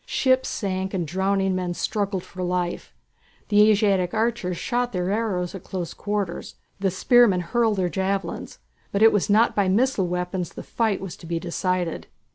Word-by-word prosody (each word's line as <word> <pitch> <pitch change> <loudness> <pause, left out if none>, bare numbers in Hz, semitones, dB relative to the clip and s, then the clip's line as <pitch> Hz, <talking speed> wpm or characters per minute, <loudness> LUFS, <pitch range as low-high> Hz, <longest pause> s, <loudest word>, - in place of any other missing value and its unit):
Ships 260 -1 +2
sank 190 -2 -2
and 175 -3 -1
drowning 190 +3 0
men 180 -1 -2
struggled 200 -3 -2
for 185 - -9
life; 180 -1 -2 0.6
the 210 +1 +6
Asiatic 195 -4 +2
archers 220 -6 0
shot 245 +2 -1
their 180 0 -1
arrows 200 -5 -1
at 190 - -8
close 180 -3 -5
quarters, 205 -4 -3 0.2
the 195 0 +1
spearmen 200 0 +4
hurled 220 +4 +1
their 185 -1 +1
javelins; 190 +3 -3 0.3
but 200 +2 +2
it 225 - +7
was 205 -1 +1
not 220 +3 +4
by 200 -2 +2
missile 210 -2 +2
weapons 180 0 -3
the - - -8
fight 220 -4 -1
was 190 -3 -6
to 170 - -12
be 165 0 -1
decided. 180 0 -2
190 Hz, 170 wpm, -24 LUFS, 180-210 Hz, 0.6 s, it